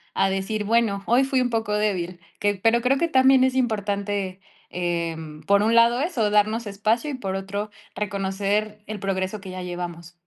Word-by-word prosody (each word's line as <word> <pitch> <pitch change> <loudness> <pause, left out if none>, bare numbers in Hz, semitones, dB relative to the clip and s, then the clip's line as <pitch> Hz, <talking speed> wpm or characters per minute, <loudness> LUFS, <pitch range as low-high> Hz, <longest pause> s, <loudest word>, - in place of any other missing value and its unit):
a 195 - +3
decir: 195 +3 -2
"Bueno, 210 -2 +1
hoy 245 +4 +4
fui 265 -1 +1
un 250 -1 0
poco 225 -2 -1
débil". 185 -4 -1 0.2
Que 205 0 +1
pero 225 +5 +2
creo 255 +3 +2
que 335 - +1
también 265 -3 +5
es 260 0 +2
importante, 205 -5 -1 0.3
em, 165 -3 -3
por 200 0 +4
un 225 +2 +2
lado 235 +2 +5
eso, 245 - 0
darnos 215 +2 +2
espacio 215 +7 0
y, - - -5
por 195 -7 -3
otro, 200 +2 -4 0.2
reconocer 200 +1 -2
el 215 -1 -5
progreso 190 +1 -2
que 190 -1 -9
ya 185 0 -6
llevamos. 175 -1 -6
205 Hz, 180 wpm, -24 LUFS, 190-230 Hz, 0.3 s, también